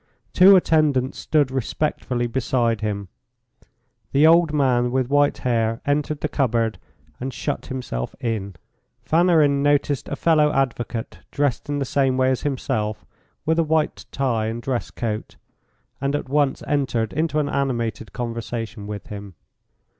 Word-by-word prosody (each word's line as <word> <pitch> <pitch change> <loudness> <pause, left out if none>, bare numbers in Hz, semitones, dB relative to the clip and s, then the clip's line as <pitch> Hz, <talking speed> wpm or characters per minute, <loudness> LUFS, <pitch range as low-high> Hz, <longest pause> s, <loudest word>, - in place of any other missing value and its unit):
Two 190 +2 +8
attendants 150 -7 +2
stood 145 -4 +1
respectfully 130 -1 -1
beside 120 -2 0
him. 100 -2 -3 1.1
The 140 +3 +5
old 165 0 +5
man 130 -5 +2
with 130 +1 -1
white 145 0 +3
hair 115 -2 0
entered 145 +1 0
the - - 0
cupboard 115 -6 0 0.4
and 130 +2 -4
shut 125 - -4
himself 120 - -4
in. 105 -5 -3 0.5
Fanarin 160 -4 +3
noticed 145 -1 +1
a - - -2
fellow 150 0 +3
advocate 120 -3 -2
dressed 145 -2 -1
in 145 - -1
the 140 - -1
same 135 -1 +1
way 130 0 +3
as 130 - -1
himself, 120 -6 -2 0.4
with 160 +1 +2
a - - +4
white 155 0 0
tie 120 -5 0
and 115 +1 -3
dress 125 0 -3
coat, 110 -2 -4 0.7
and 140 +1 0
at 145 - -3
once 145 -1 +1
entered 125 -6 0
into 155 0 0
an 150 -1 +1
animated 115 -7 -2
conversation 115 -2 -5
with 105 -1 -6
him. 100 -3 -9
130 Hz, 145 wpm, -22 LUFS, 115-145 Hz, 1.1 s, Two